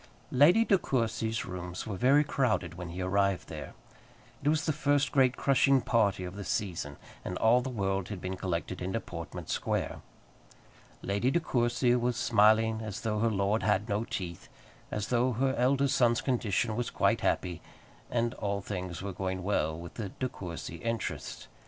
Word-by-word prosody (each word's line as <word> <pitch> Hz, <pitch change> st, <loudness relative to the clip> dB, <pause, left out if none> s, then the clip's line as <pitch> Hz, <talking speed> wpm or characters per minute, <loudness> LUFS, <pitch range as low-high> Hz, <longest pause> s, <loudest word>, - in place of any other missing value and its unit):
Lady 170 Hz, -, +6 dB
De 195 Hz, -4 st, +4 dB
Courcy's 115 Hz, -4 st, -1 dB
rooms 90 Hz, -1 st, -6 dB
were 105 Hz, -, -4 dB
very 135 Hz, +8 st, +4 dB
crowded 120 Hz, -, 0 dB
when 90 Hz, 0 st, -7 dB
he 90 Hz, +2 st, -4 dB
arrived 100 Hz, 0 st, +1 dB
there. -, -, -7 dB, 0.7 s
It 145 Hz, -, +3 dB
was 155 Hz, 0 st, +1 dB
the 155 Hz, -, +1 dB
first 145 Hz, -2 st, +1 dB
great 130 Hz, -2 st, +3 dB
crushing 135 Hz, 0 st, +4 dB
party 105 Hz, -6 st, +1 dB
of 90 Hz, +1 st, -6 dB
the 100 Hz, -, -5 dB
season, 85 Hz, -9 st, -3 dB, 0.3 s
and 90 Hz, -, -4 dB
all 120 Hz, +3 st, +4 dB
the 130 Hz, -, -4 dB
world 95 Hz, -5 st, -1 dB
had 105 Hz, -3 st, -5 dB
been 95 Hz, +1 st, -4 dB
collected 90 Hz, -1 st, -3 dB
into 95 Hz, +5 st, -1 dB
Portman 85 Hz, -6 st, -7 dB
Square. -, -, -2 dB, 1.0 s
Lady 100 Hz, +6 st, +1 dB
De 170 Hz, -, +2 dB
Courcy 120 Hz, -4 st, +2 dB
was 120 Hz, -1 st, 0 dB
smiling 110 Hz, 0 st, +4 dB
as 110 Hz, -2 st, -5 dB
though 105 Hz, -2 st, -1 dB
her 115 Hz, +1 st, +3 dB
lord 100 Hz, +1 st, +1 dB
had 105 Hz, 0 st, +1 dB
no 105 Hz, 0 st, 0 dB
teeth, 90 Hz, -6 st, -6 dB, 0.4 s
as 105 Hz, -1 st, -3 dB
though 125 Hz, +1 st, +2 dB
her 130 Hz, +3 st, +1 dB
eldest 135 Hz, +2 st, +2 dB
son's 120 Hz, -3 st, +3 dB
condition 115 Hz, -3 st, 0 dB
was 120 Hz, 0 st, -2 dB
quite -, -, +1 dB
happy, 90 Hz, -2 st, 0 dB, 0.5 s
and 120 Hz, 0 st, 0 dB
all 100 Hz, -3 st, -2 dB
things 90 Hz, -3 st, -5 dB
were 100 Hz, -1 st, -4 dB
going 95 Hz, 0 st, -3 dB
well 80 Hz, -5 st, 0 dB
with 85 Hz, 0 st, -9 dB
the 105 Hz, -4 st, -5 dB
De 130 Hz, -, -3 dB
Courcy 85 Hz, -7 st, -7 dB
interests. 115 Hz, +4 st, -4 dB
110 Hz, 175 wpm, -30 LUFS, 95-125 Hz, 1.0 s, Lady